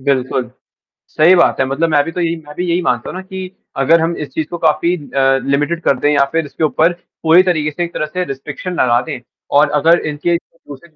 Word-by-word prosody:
बिल्कुल। 130 -2 -1 0.6
सही 170 +4 +5
बात 170 - +3
है 135 - +2
मतलब 140 +5 -1
मैं 145 -2 +3
भी 165 - -5
तो 180 - -3
यही 170 0 0
मैं 150 -3 -12
भी 180 - -2
यही 170 +2 +1
मानता 175 - -1
हूँ - - -7
ना - - -5
कि 190 -1 -7 0.3
अगर 155 +5 +4
हम 165 +1 0
इस 150 - -5
चीज़ 155 -1 -3
को 175 - -5
काफ़ी 165 +2 +1
अ, 135 -4 +1
लिमिटेड 145 +5 0
कर 135 - +2
दें 145 - +2
या 140 -1 +4
फिर 165 -1 0
इसके 145 - -5
ऊपर 160 +3 +2 0.3
पूरी 165 +3 +6
तरीके 160 -5 0
से 175 +4 -3
एक 170 - -5
तरह - - -2
से 180 +4 -3
रिस्ट्रिक्शन 140 +5 -6
लगा 120 -1 +3
दें 145 -3 -6 0.4
और 150 - +4
अगर 165 +3 +4
इनके 150 +3 -1
जो 165 - -23
दूसरे 145 +4 -11
जो 155 - -35
160 Hz, 245 wpm, -16 LUFS, 140-170 Hz, 0.6 s, पूरी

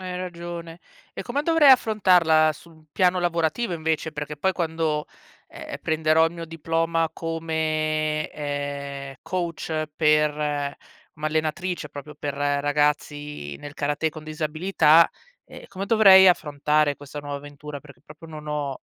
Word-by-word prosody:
Hai 185 -1 -5
ragione. 170 -2 -7 0.4
E - - -5
come 275 +4 -2
dovrei 320 -3 +5
affrontarla 180 -10 +4
su 170 +3 -16
un 160 -1 -20
piano 180 0 +2
lavorativo, 175 +5 0
invece? 160 -1 -2
Perché 150 0 -5
poi 190 +6 +1
quando, 160 -3 -1 0.4
e - - -12
ehm, - - -4
prenderò 160 0 +3
il 165 - -5
mio 170 -1 -7
diploma 165 0 -1
come, 155 -2 -1
ehm, 140 -1 -5
coach 165 -3 -3
per 150 -1 +3 0.8
m 155 -1 -9
allenatrice, 160 +4 -2
proprio 145 +1 -10
per 145 -1 -4
ragazzi 145 - -1
nel 145 0 -9
karatè 145 +2 -1
con 155 0 -10
disabilità, 155 +1 +3 0.4
ehm, - - -12
come 195 0 -6
dovrei 195 -4 +8
affrontare 150 -2 +1
questa 145 +1 -8
nuova 145 0 -5
avventura? 145 0 -9
Perché 140 -4 -16
proprio 160 +2 -13
non 155 -1 -9
ho 145 -3 -3
155 Hz, 140 wpm, -24 LUFS, 150-170 Hz, 0.8 s, dovrei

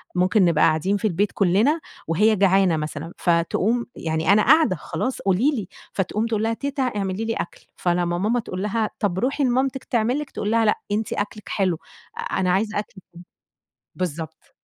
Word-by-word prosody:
ممكن 185 +2 +3
نبقى 165 -3 +3
قاعدين 165 +6 +2
في 210 - 0
البيت 200 +2 0
كلنا 215 - +3 0.3
وهي 210 +7 +3
جعانة 190 -3 +3
مثلًا، 155 +2 -5
فتقوم 185 +7 +1
يعني، 160 +3 0
أنا 215 - +5
قاعدة 310 -4 +5
خلاص 175 - -3
قولي 200 +10 +2
لي 215 - -3 0.3
فتقوم 205 +3 -1
تقول 220 -2 -1
لها: 225 +1 +1
"تيتة 280 +2 -2
اعملي 205 -3 -2
لي 225 - -1
أكل." 175 - -6
فلما 175 -1 0
ماما 220 +6 +1
تقول 185 -5 -5
لها 215 +1 0
طب 190 -3 0
روحي 275 +5 0
لمامتِك 260 +1 +1
تعمل 240 +3 0
لِك 295 -2 -6
تقول 210 - -3
لها: 225 -1 +3
"لأ 210 - +2
أنتِ 215 +1 -1
أكلك 205 0 -4
حلو 185 -4 0 0.5
أنا 185 -1 +1
عايزة 210 +2 0
أكلك 205 - -7 0.2
أنتِ." 175 - -12 0.7
بالضبط. 160 -3 -5
205 Hz, 175 wpm, -23 LUFS, 180-230 Hz, 0.7 s, أنا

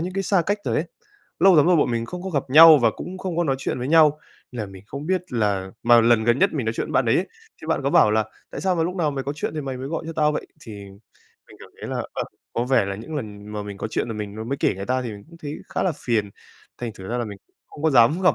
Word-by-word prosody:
những 180 +2 -3
cái 195 - -1
xa 195 -2 +2
cách 205 +1 0
rồi - - -1
ấy. - - +1 0.5
Lâu 190 -2 +6
lắm 150 - +5
rồi 180 0 +5
bọn 145 - +2
mình 115 -1 -2
không 180 +6 -7
có 190 - -5
gặp 140 -5 0
nhau 155 +1 +9
và 115 -2 +3
cũng 185 +1 -7
không 185 -3 -4
có 175 - +1
nói 135 -3 0
chuyện 130 - -3
với 125 - -4
nhau, 155 -1 +5 0.3
nên 125 - -5
là 105 - -3
mình 95 0 -13
không 140 +5 -7
biết 185 -2 -2
là 100 -5 0
mà 120 0 +6
lần 115 -1 +3
gần 120 +2 +3
nhất 195 +2 +3
mình 135 -7 -3
nói 110 - 0
chuyện - - -2
với - - -7
bạn - - +3
đấy - - +3
ấy, - - -1 0.3
thì - - -8
bạn - - 0
có - - 0
bảo 105 - +5
là 110 0 +2 0.3
"Tại - - -6
sao 190 -1 +1
mà 165 - +1
lúc 180 +3 -2
nào 160 -5 +1
mày 135 -2 -4
có 140 - -2
chuyện 155 - -3
thì 155 - -2
mày 135 -2 -5
mới 130 +2 -6
gọi 165 - -3
cho 165 - -5
tao 150 -1 +2
vậy?" - - -4
Thì 115 -7 -10 0.8
mình - - -15
cảm - - -13
thấy - - -6
là, - - -2 0.2
ờ, - - -3 0.3
có 120 - -1
vẻ 130 -5 +3
là 100 0 -4
những 115 +10 -8
lần 105 -6 -7
mà 105 -1 -4
mình 100 -1 -7
có - - -3
chuyện 115 - -2
là 115 - -4
mình 105 -1 -6
m - - -8
mới 140 - -1
kể - - +1
người 95 +1 -6
ta 130 +1 0
thì 120 - -5
mình 100 -1 -11
cũng 170 - -15
thấy 150 -2 -6
khá - - -2
là 185 - +1
phiền. 110 -4 0 0.5
Thành 120 -2 -4
thử 95 -3 -10
ra 120 - -2
là 120 - -1
mình 100 -3 -8
cũng - - -44
không 150 - -12
có 160 - +3
dám 135 +8 +4
gặp 180 - +4
130 Hz, 325 wpm, -23 LUFS, 110-165 Hz, 0.8 s, nhau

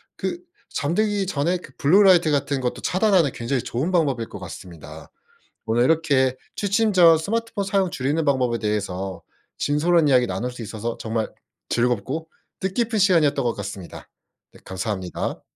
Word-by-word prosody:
그 350 - -3 0.3
잠들기 200 +6 0
전에 175 0 0
그 175 - -13
블루 175 +7 +5
라이트 180 -4 +5
같은 140 -2 0
것도 125 - -3
차단하는 185 -5 +3
굉장히 120 +1 -2
좋은 135 +10 -2
방법일 140 -10 0
것 - - -8
같습니다. 80 -4 -10 0.6
오늘 115 +2 +2
이렇게 140 -5 +2 0.2
취침 210 +2 +1
전 170 -4 +7
스마트폰 225 +4 -2
사용 195 -1 +1
줄이는 145 +5 -1
방법에 130 -4 +1
대해서 95 -4 -3 0.4
진솔한 155 +1 +2
이야기 125 -2 +4
나눌 125 +2 -3
수 125 -1 -10
있어서 110 +2 -5
정말 110 0 -3 0.4
즐겁고 125 +6 -1 0.3
뜻깊은 215 +3 -1
시간이었던 155 -8 +3
것 120 - +1
같습니다. 100 -3 -8 0.4
네 - - -17
감사합니다. 95 -1 -4
140 Hz, 355 characters per minute, -23 LUFS, 115-180 Hz, 0.6 s, 전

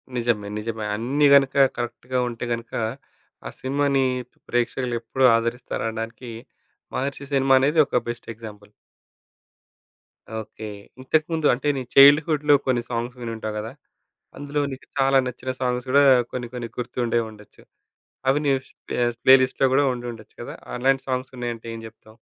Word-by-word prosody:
నిజమే. 115 -4 0
నిజమే. 110 0 -4
అన్నీ 135 +7 +1
గనుక 140 0 +4 0.2
కరెక్ట్‌గా 120 +1 -3
ఉంటే 120 0 -5
గనుక, 115 0 -7 0.7
ఆ - - -4
సినిమాని 140 0 +1 0.4
ప్రేక్షకులు 120 0 -1
ఎప్పుడు 130 +3 +1
ఆదరిస్తారనడానికి 115 0 -3 0.6
'మహర్షి' 140 +1 -4
సినిమా 135 -1 +4
అనేది 150 +4 +2
ఒక 125 - +1
బెస్ట్ 120 0 -6
ఎగ్జాంపుల్. 105 -2 -11 1.7
ఓకే. 110 0 -8 0.3
ఇంతకుముందు 155 +3 +1
అంటే 135 +4 -3
నీ 130 - -2
చైల్డ్‌హుడ్‌లో 145 +1 +7
కొన్ని 125 -2 +1
సాంగ్స్ 120 +1 -3
వినుంటావు 110 -2 -4
కదా! 110 +2 -6 0.7
అందులో 145 +1 -2
నీకు 130 - -12
చాలా 135 0 +4
నచ్చిన 125 +1 -4
సాంగ్స్ 125 0 -1
గూడా 140 +1 +6 0.3
కొన్ని 120 -2 -5
కొన్ని 120 -2 -5
గుర్తుండే 120 -1 -1
ఉండొచ్చు. 105 -1 -16 0.7
అవి 135 +2 +3
నీ 140 - +3 0.2
స్ప - - -25 0.3
ప్లే‌లిస్ట్‌లో 130 0 +5
గూడా 145 +1 +4
ఉండి 120 0 -6
ఉండొచ్చు 110 -2 -15
కదా! - - -8 0.2
అలాంటి 135 +2 +1
సాంగ్స్ 130 0 -2
ఉన్నాయంటే 120 -1 -5
ఏం 115 - -8
చెప్తావు? 110 0 -18
125 Hz, 135 wpm, -23 LUFS, 115-135 Hz, 1.7 s, చైల్డ్‌హుడ్‌లో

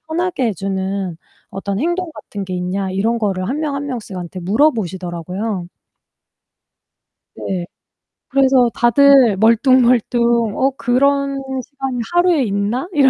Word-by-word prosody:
편하게 350 -7 -1
해 220 - -1
주는 190 -1 -3 0.3
어떤 195 +1 -4
행동 345 +3 -1
같은게 195 -8 -7
있냐?" 185 +2 -2
이런 220 +5 0
거를 190 -3 -1
1 285 +4 -2
명 300 -3 -2
1 280 +1 -4
명씩한테 190 -8 -6
물어보시더라고요. 185 - -1 1.7
네. 180 -2 -4 0.6
그래서 265 -2 +4
다들 245 -3 +5
멀뚱멀뚱 235 -1 +3
'어, 270 +1 +2
그런 275 +2 +1 0.2
시간이 270 -3 -5
하루에 350 -5 +3
있나?' 210 - -1
이런 275 -3 +5
235 Hz, 250 characters per minute, -18 LUFS, 195-275 Hz, 1.7 s, 다들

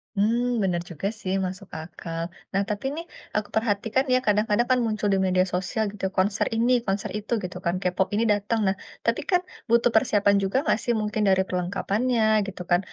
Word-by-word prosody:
Hmm, 220 +4 +2 0.2
bener 175 -2 0
juga 170 +4 -3
sih, 185 0 -2
masuk 185 +1 -6
akal. 165 +1 -6 0.3
Nah, 195 +1 +2
tapi 210 +4 -3
nih 335 +1 -5 0.3
aku 210 0 -1
perhatikan 225 +4 +1
ya, - - +6
kadang-kadang 210 +3 +2
kan 255 - +4
muncul 215 -1 -1
di - - +3
media 185 0 +3
sosial, 190 +4 -1
gitu, 195 -2 -4
konser 195 +2 +2
ini, 235 +3 +2 0.2
konser 195 +1 -1
itu, 210 +3 -9
gitu 180 - -5
kan, 170 - +1
K-pop 180 +1 +1
ini 225 - +2
datang. 210 +3 -1
Nah, 190 - +2 0.3
tapi - - +1
kan 360 0 +4 0.3
butuh 235 0 +4
persiapan 205 -2 +4
juga 195 +5 -2
enggak 220 - +2
sih 240 - +1
mungkin 215 +1 -1
dari 190 0 +4
perlengkapannya, 200 +6 0 0.3
gitu 185 -2 -7
kan, 175 - +6
205 Hz, 190 wpm, -25 LUFS, 185-225 Hz, 0.3 s, ya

